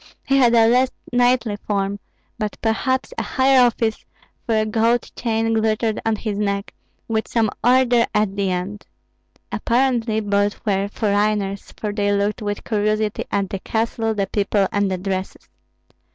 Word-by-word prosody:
He 275 - +2
had 240 -3 +5
a 225 -1 +6
less 250 +2 +4 0.2
knightly 245 -3 +2
form, 200 -1 -2 0.4
but 215 -2 -3
perhaps 260 +4 0
a - - 0
higher 265 0 +3
office, 230 -2 +1 0.4
for 225 - +2
a 215 - +2
gold 230 +2 +1
chain 225 -1 0
glittered 220 0 0
on 225 -1 +1
his 210 -1 -4
neck, 200 -1 -2 0.3
with 220 -1 -1
some 225 -3 +1
order 245 -1 +4
at 210 -2 +1
the 200 -1 0
end. 185 +3 -4 0.6
Apparently 235 -3 +1
both 205 -1 0
were 200 -1 +1
foreigners, 205 -1 -1
for 210 -1 -3
they 205 -1 0
looked 205 +3 0
with 205 -1 -3
curiosity 215 -1 -1
at 195 -1 -1
the 195 - -3
castle, 225 +1 -1
the 200 -1 0
people, 200 0 +1
and 205 -1 +1
the 185 - -1
dresses. 190 0 -4
215 Hz, 155 wpm, -21 LUFS, 205-230 Hz, 0.6 s, a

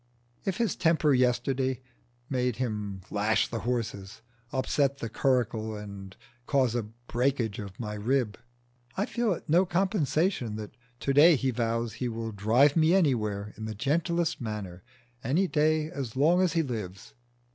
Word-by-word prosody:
If 195 -2 -1
his 230 -5 0
temper 160 -3 +3
yesterday 130 +1 +1 0.5
made 125 -3 0
him 105 -6 -3
lash 105 +1 +2
the 115 - -4
horses, 110 -4 -4 0.3
upset 140 +1 +1
the 115 - -5
curricle 115 -4 0
and 100 -2 -9 0.3
cause 130 -5 +2
a 120 - 0
breakage 120 +1 -2
in 100 -2 -5
my 105 -3 -4
rib, 115 +1 0 0.6
I 200 - +1
feel 235 -2 0
it 165 - -8
no 170 +4 +5
compensation 175 - 0
that 105 0 -7 0.3
to 140 - 0
day 155 +4 +7
he 135 -1 0
vows 115 -1 -1
he 125 - -3
will 115 0 -4
drive 115 +8 +3
me 165 +2 +4
anywhere 105 - +1
in 110 - -7
the 110 -1 -5
gentlest 165 - 0
manner 105 -6 -5 0.4
any 160 +11 +2
day 155 0 +1
as 130 -5 -5
long 165 +7 +4
as 180 -4 +2
he 165 -1 +2
lives. 105 - -6
125 Hz, 155 wpm, -28 LUFS, 110-150 Hz, 0.6 s, day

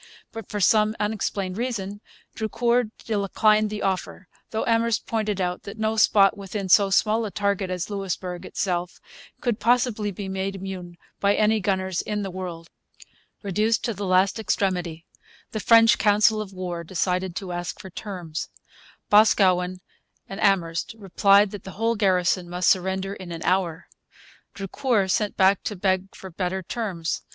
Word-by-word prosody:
But, 225 -1 -8
for 210 - -3
some 215 +3 +3
unexplained 205 -2 -2
reason, 205 -5 -3 0.3
Drucour 235 +2 +1 0.2
declined 215 0 +2
the 210 0 -5
offer; 190 0 -3 0.2
though 220 - -2
Amherst 230 -2 +1
pointed 215 -3 -1
out 180 -1 -2
that 200 +2 -9
no 220 0 0
spot 200 -3 +5
within 195 -1 -5
so 200 +1 +6
small 215 +3 +2
a 215 - -3
target 200 -1 -1
as 180 -2 -3
Louisbourg 185 -3 -4
itself 180 -2 -3 0.4
could 240 -4 -1
possibly 235 -3 +1
be 200 0 -6
made 190 +1 -3
immune 185 -2 -7 0.2
by 200 0 +3
any 215 +1 +3
gunners 190 -2 -1
in 210 -1 -3
the 195 - -4
world. 175 -3 -6 0.8
Reduced 210 +3 +1
to 230 - -1
the 200 0 -5
last 185 +3 +3
extremity, 180 -6 -1 0.5
the 215 - -3
French 230 +1 +5
council 215 +1 +4
of 205 -2 -7
war 180 -2 -5
decided 180 +1 -1
to 190 -2 -5
ask 175 -1 -4
for 190 - -10
terms. 175 -6 -6 0.6
Boscawen 185 -4 +4 0.5
and 195 +2 -7
Amherst 175 -2 +1
replied 200 0 +4
that 205 - -8
the 190 - -9
whole 225 +1 +1
garrison 185 -3 +1
must 180 +1 +2
surrender 190 +1 -1
in 185 -3 -9
an 165 -1 -6
hour. 180 -3 0 0.7
Drucour 200 +1 0
sent 210 +1 0
back 190 0 +4
to 210 - -3
beg 190 0 -1
for 190 - -10
better 185 +2 -3
terms. 180 -6 -3
195 Hz, 155 wpm, -24 LUFS, 185-215 Hz, 0.8 s, so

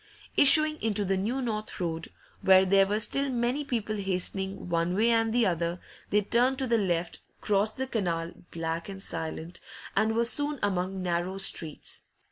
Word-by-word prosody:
Issuing 310 +2 +6
into 210 -2 0
the 195 +1 +1
New 235 +8 -2
North 215 -3 -4
Road, 165 -2 -3 0.3
where 190 0 +6
there 195 +1 +4
were 210 +2 0
still 275 +6 +2
many 245 +3 -1
people 220 -5 -3
hastening 190 0 -2
one 170 +1 0
way 225 +4 +3
and 225 -1 +2
the 240 0 +2
other, 170 -1 -1 0.3
they 210 - +3
turned 245 +6 +1
to 265 - -1
the 235 -2 +2
left, 175 -3 -2 0.2
crossed 210 +1 0
the 265 - -2
canal 175 -9 -2 0.2
black 165 +2 -4
and 195 0 -8
silent 165 0 -6 0.4
and 220 +2 +1
were 235 +1 +2
soon 290 +4 +1
among 190 -1 -1
narrow 175 +2 -2
streets. 165 -5 +1
200 Hz, 170 wpm, -28 LUFS, 180-235 Hz, 0.4 s, Issuing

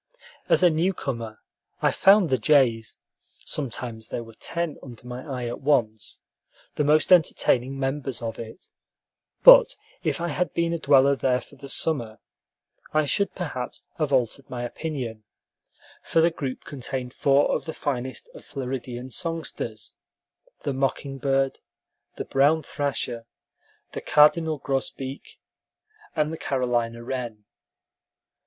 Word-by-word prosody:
As - - +5
a 175 - +7
new 175 +5 +1
comer, 115 -7 -5 0.4
I - - +3
found 195 -5 +5
the 130 - +3
jays 115 -3 +3 0.5
(sometimes 120 -5 -4
there 120 - -4
were 115 0 -13
ten 170 +7 -4
under 120 -2 -11
my 125 +1 -6
eye 130 -4 -5
at 120 - -5
once) 110 -7 0 0.5
the 150 - 0
most 155 +5 +4
entertaining 135 -6 +3
members 135 -1 -2
of 115 -1 -5
it, 115 +9 -10 0.7
but - - +9 0.3
if - - -1
I 170 0 -2
had 180 +4 -2
been 170 0 +1
a 170 - -2
dweller 140 -2 +5
there 130 -2 +1
for 145 - -15
the 140 0 -10
summer, 120 -9 -1 0.7
I 155 0 +2
should 200 +7 0
perhaps 145 -9 -5 0.2
have 150 -2 0
altered 130 +1 0
my 120 -1 -4
opinion; 120 -5 -5 0.8
for - - +1
the 165 +1 +4
group 135 -5 -5
contained 130 -2 -5
four 140 0 +3
of - - -3
the 160 - -4
finest 130 -2 -4
of - - -12
Floridian 130 -2 -5
songsters, 165 +4 -4 0.7
the 140 - -1
mocking 135 +1 -2
bird, 135 0 +1 0.6
the - - -5
brown 145 +4 +3
thrasher, 125 -5 -3 0.6
the - - -5
cardinal 155 +1 +4
grosbeak, 135 0 -4 0.8
and 155 0 0
the 160 - -6
Carolina 120 -3 -1
wren. 120 -4 -5
135 Hz, 135 wpm, -25 LUFS, 125-155 Hz, 0.8 s, but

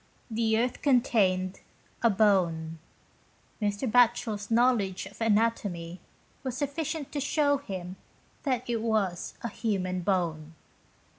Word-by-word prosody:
The 220 0 +1
earth 245 +2 -1
contained 200 -9 +2 0.4
a 235 - +5
bone. 175 -6 +2 0.8
Mr. 205 +4 -1
Batchel's 235 -3 +2
know 240 +3 +5
ledge 195 -5 -3
of 200 +4 -13
anatomy 205 -6 0 0.4
was 260 -3 -4
sufficient 290 +1 -3
to 290 - -2
show 285 0 +2
him 185 -7 -6 0.4
that 255 -4 -1
it 235 -2 -1
was 210 -6 -1
a 235 - -2
human 185 -5 -2
bone. 165 -4 -1
215 Hz, 120 wpm, -28 LUFS, 185-245 Hz, 0.8 s, a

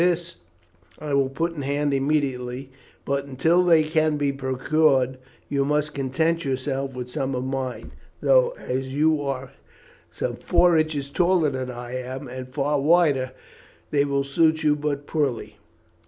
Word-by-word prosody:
This 175 - 0 0.6
I 150 -2 -5
will 135 -1 +2
put 165 +5 -2
in 150 - -6
hand 145 +1 0
immediately; 135 -2 -1 0.3
but, 140 0 -1
until 160 +7 +2
they 165 -3 +5
can 155 -1 +1
be 145 -1 +1
procured, 130 0 +1 0.3
you 140 -1 0
must 150 +1 0
content 160 +5 0
yourself 135 0 -2
with 125 -1 -5
some 135 -2 -2
of 125 - -2
mine, 130 -1 -4 0.3
though, - - +3
as 130 +1 -3
you 155 0 +3
are 135 -1 -4 0.6
some - - -4
four 175 -1 +3
inches 155 -3 0
taller 175 -2 +2
than 130 -1 -4
I 120 0 -6
am 130 +2 -6
and 130 +1 -7
far 145 +2 0
wider, 145 -5 +3 0.6
they 140 -1 +3
will 140 -1 0
suit 160 +3 +2
you 150 -1 +4
but 145 -1 -3
poorly. 125 -10 -2
140 Hz, 155 wpm, -24 LUFS, 130-155 Hz, 0.6 s, they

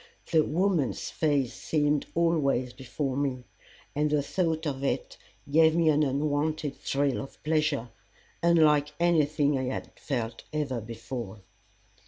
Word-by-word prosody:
The 160 -3 +5
woman's 170 -3 0
face 145 -6 +1
seemed 150 -2 0
always 140 -7 +1
before 135 +1 -3
me, 135 -3 -1 0.5
and 150 +1 +1
the 145 -1 +1
thought 165 0 -1
of 135 -2 -3
it 140 - -2 0.3
gave 160 +2 +5
me 165 -2 +4
an 150 0 +3
unwonted 145 +1 0
thrill 140 -1 0
of 135 - -11
pleasure, 155 -6 0 0.5
unlike 150 -3 +4
anything 150 -4 +2
I 130 - -2
had 130 - -4 0.2
ever 120 -5 0 0.4
felt 115 -4 -4
before. 115 -3 -6
145 Hz, 130 wpm, -28 LUFS, 135-155 Hz, 0.5 s, The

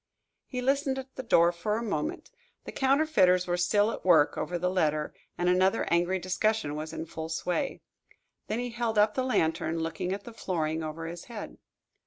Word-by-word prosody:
He 250 -2 -4
listened 275 0 +1
at 265 0 -7
the - - -4
door 170 -8 +4
for 210 +5 -2
a 230 - -3
moment. 175 -9 -3 0.3
The - - -7
counterfeiters 265 -11 +3
were 175 - 0
still 205 +5 +2
at - - -7
work 165 -5 +5
over 175 - -2
the 180 +1 0
letter, 155 -4 0 0.2
and 175 - 0
another 185 +4 +3
angry 175 +2 +2
discussion 185 -1 0
was 155 +1 -5
in 160 - -5
full 160 0 -6
sway. 180 - -2 0.7
Then 220 - -1
he 245 0 -3
held 230 -2 -2
up 210 +1 +4
the 260 - 0
lantern, 165 -9 0
looking 165 +3 -3
at 200 +1 -3
the 235 - -10
flooring 160 -6 -2
over 160 +1 -5
his 170 +1 -7
head. 230 -3 -8
185 Hz, 190 wpm, -29 LUFS, 165-230 Hz, 0.7 s, work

